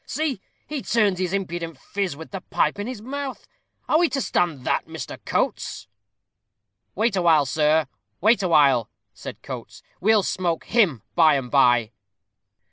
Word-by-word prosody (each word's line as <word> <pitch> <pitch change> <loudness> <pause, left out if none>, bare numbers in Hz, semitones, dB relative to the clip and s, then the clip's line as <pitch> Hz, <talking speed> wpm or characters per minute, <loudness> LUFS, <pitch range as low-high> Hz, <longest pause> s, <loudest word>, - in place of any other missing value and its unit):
See, 295 -9 -2 0.2
he 295 -2 -4
turns 210 -7 +1
his 185 -2 -1
impudent 170 -5 -3
phiz, 190 +1 -3
with 160 - -10
the 195 -2 -5
pipe - - 0
in 205 - -3
his 245 -4 -6
mouth! 275 +1 -5 0.4
Are 310 - +3
we 345 -1 +3
to 275 - -2
stand 165 - -1
that, - - 0
Mr. - - -8
Coates?" - - -2 1.1
"Wait 220 +1 +1
awhile, 165 -5 +4
sir 150 +4 +2 0.3
wait 215 +3 +4
awhile," 145 - +4 0.2
said - - -9
Coates; - - -8 0.2
"we'll 215 0 +3
smoke 175 -4 -1
him 185 - +2
by 160 -3 +5
and 130 -3 -3
by." 120 -5 +4
180 Hz, 150 wpm, -23 LUFS, 150-220 Hz, 1.1 s, by